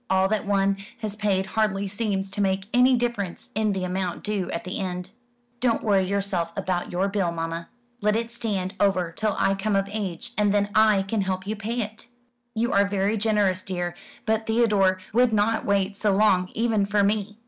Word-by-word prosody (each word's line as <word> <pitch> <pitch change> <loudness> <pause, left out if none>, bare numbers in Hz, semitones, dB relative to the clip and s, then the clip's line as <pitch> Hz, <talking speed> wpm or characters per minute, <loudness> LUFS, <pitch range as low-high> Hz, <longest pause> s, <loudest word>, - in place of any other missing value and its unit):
All 190 0 +3
that 215 -1 -1
one 195 -1 +2 0.2
has 210 -2 -3
paid 200 -3 +1
hardly 200 -1 0
seems 195 -2 -2
to 205 - -2
make 190 0 +1
any 250 +1 +5
difference 235 -7 -3
in 215 0 +1
the 190 -2 -2
amount 185 -1 -2
due 210 -4 -2
at 170 - -3
the 185 +2 -4
end." 180 -1 -4 0.5
"Don't 235 -2 +1
worry 195 -3 +3
yourself 195 -3 -1
about 180 -1 -2
your 185 +2 +1
bill, 195 -4 0
mamma. 165 0 -4 0.3
Let 210 +1 +2
it 230 +1 -2
stand 205 -5 -3
over 185 -4 +2
till 215 +4 -1
I 195 - +3
come 200 +1 -1
of 195 0 +1
age, 195 -6 -4
and 205 -1 +3
then 205 0 +1
I 215 -3 +5
can 205 +2 -1
help 185 -1 -2
you 210 - -2
to 220 - -10
pay 235 +3 -1
it." 220 +2 -7 0.5
"You 235 +2 0
are 200 0 +4
very 200 +1 0
generous, 205 -3 +1
dear; 175 -2 -3 0.3
but 220 0 0
Theodore 210 -5 +3 0.2
would 245 +1 +4
not 220 +2 +1
wait 200 0 +1
so 205 -1 +1
long, 190 -3 +3
even 220 -3 +1
for 205 0 +2
me. 205 0 0
200 Hz, 200 wpm, -25 LUFS, 190-215 Hz, 0.5 s, any